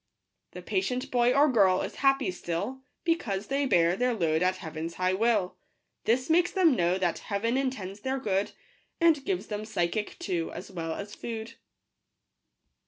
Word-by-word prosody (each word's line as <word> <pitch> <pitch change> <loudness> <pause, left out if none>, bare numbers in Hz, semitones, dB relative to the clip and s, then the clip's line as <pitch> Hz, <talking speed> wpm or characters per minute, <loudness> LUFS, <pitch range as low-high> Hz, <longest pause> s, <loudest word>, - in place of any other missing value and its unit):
The - - -8
patient 255 -9 -1
boy 245 0 +4
or 285 +3 +5
girl 195 -8 +4
is - - -6
happy 270 -5 +2
still. 180 +9 -4 0.2
Because 225 - 0
they 275 +4 0
bear 170 -6 +4
their 250 +2 +1
load 160 -5 +1
at 185 +1 +2
Heaven's 160 0 -6
high 185 0 +1
will; 210 -2 +1 0.5
This 250 +3 +2
makes 340 +2 +4
them 345 -8 +4
know 175 -2 +2
that 180 -3 0
Heaven 225 +4 0
intends 220 -8 -2
their 265 +5 -2
good, 200 -6 -1 0.5
And 330 -5 +4
gives 380 +1 -2
them 210 0 -4
physic 210 -1 -2
too, 170 -4 -2
as 195 - -8
well 165 -3 -4
as 205 +1 -7
food. 225 -1 -6
215 Hz, 165 wpm, -28 LUFS, 185-265 Hz, 0.5 s, or